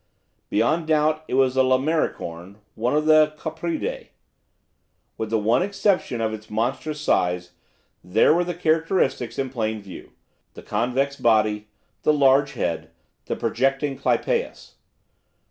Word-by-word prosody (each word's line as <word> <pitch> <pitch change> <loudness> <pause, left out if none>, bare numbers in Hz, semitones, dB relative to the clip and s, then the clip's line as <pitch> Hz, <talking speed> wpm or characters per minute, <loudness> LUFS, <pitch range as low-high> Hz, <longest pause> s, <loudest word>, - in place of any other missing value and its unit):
Beyond 160 +1 +1
doubt 155 0 +2
it - - -2
was 130 -1 +3
a 130 - +4
lamellicorn, 130 - -1 0.2
one 120 +5 -1
of 150 0 +1
the 155 -1 +5
copridae. 170 - -4 1.1
With 110 - -4
the 110 - +1
one 110 +7 +2
exception 195 - 0
of 110 -1 -1
its 110 0 -9
monstrous 130 +8 -2
size, 90 -10 0 0.5
there 100 +10 +4
were 175 +2 +2
the 175 -1 -4
characteristics 160 -6 0
in 135 -2 -2
plain 110 -3 -2
view; 100 -3 -12 0.4
the - - -11
convex 135 +4 -1
body, 105 -2 +2 0.3
the 155 - +3
large 140 0 +3
head, 80 -2 -3 0.4
the - - -2
projecting 135 +2 0
clypeus. 480 - -1
135 Hz, 130 wpm, -23 LUFS, 110-155 Hz, 1.1 s, the